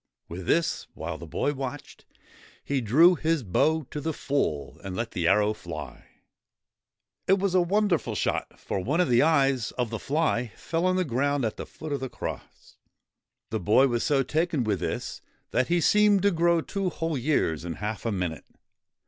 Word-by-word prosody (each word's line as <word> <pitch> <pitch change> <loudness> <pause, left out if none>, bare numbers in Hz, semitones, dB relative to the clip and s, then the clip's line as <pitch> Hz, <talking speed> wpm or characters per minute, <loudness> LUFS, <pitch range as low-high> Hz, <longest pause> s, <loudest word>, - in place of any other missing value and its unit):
With 85 +1 -7
this, 170 0 +1
while 80 0 -5
the 85 - -9
boy 110 - -1
watched, 135 +1 -7 0.6
he 140 -2 -1
drew 155 - +6
his 160 -3 0
bow 155 - +2
to 150 - -4
the 160 +2 -2
full, 75 - -2
and 95 -2 -5
let 115 +3 -3
the 85 -2 -1
arrow 105 +4 +4
fly. - - -8 1.2
It 195 - +5
was 195 -1 0
a 185 - +5
wonderful 195 -1 +1
shot, - - -2
for - - -3
one 140 - -1
of 180 - +3
the 120 0 +5
eyes 135 -6 +3
of 120 -3 -2
the 115 - -3
fly 135 -6 0
fell 170 +2 -1
on 185 - +2
the 185 0 +1
ground 140 0 0
at 110 - -3
the - - -6
foot 155 -2 -7
of 140 - -1
the 130 - -4
cross. - - -8 0.7
The - - -1
boy 105 +9 +4
was 120 -1 0
so 140 -3 +2
taken 160 -1 0
with 105 -4 0
this, - - -4 0.3
that 130 - +1
he 175 0 +2
seemed 205 +3 +4
to 200 - +4
grow 170 -1 +3
two 195 +2 -2
whole 165 -2 -3
years 125 - 0
in 85 -1 -4
half 105 +4 -4
a 115 - -1
minute. 90 -5 -3
140 Hz, 190 wpm, -27 LUFS, 110-165 Hz, 1.2 s, drew